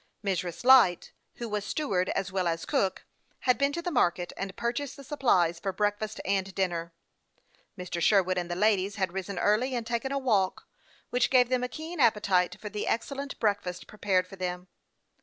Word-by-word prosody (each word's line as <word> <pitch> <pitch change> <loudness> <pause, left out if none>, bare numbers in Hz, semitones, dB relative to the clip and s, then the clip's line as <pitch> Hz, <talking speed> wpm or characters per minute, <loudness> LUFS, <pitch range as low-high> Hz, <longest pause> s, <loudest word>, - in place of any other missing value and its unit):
Mrs. 180 -2 -2
Light, 250 -9 +6 0.2
who 235 - -5
was 210 -2 -2
steward 195 -10 -1
as 195 0 -2
well 185 -2 0
as 165 -1 -2
cook, 195 -10 0 0.4
had 250 -1 +2
been 280 0 +2
to 340 +2 -3
the 355 - -2
market, 175 - +1
and 195 0 -5
purchased 240 +4 -2
the 275 - -10
supplies 185 - +2
for 195 - -2
breakfast 205 +2 -2
and 195 -1 -1
dinner. 170 -3 -2 0.8
Mr. 180 -1 -4
Sherwood 185 -1 +3
and 175 0 -5
the 175 - -2
ladies 200 0 +2
had 190 -4 -1
risen 195 0 -4
early, 215 +8 +2
and 235 -2 -2
taken 235 +3 -2
a 275 - 0
walk, 210 -8 0 0.4
which 245 0 +2
gave 250 -2 +4
them 255 -1 +1
a - - 0
keen 320 +4 -7
appetite 200 -7 +3
for 210 - -7
the 210 0 -4
excellent 275 +4 -3
breakfast 200 -5 -1
pre 210 - -16
pared 185 -2 +2
for 195 +1 -12
them. 180 0 -4
200 Hz, 190 wpm, -28 LUFS, 185-245 Hz, 0.8 s, Light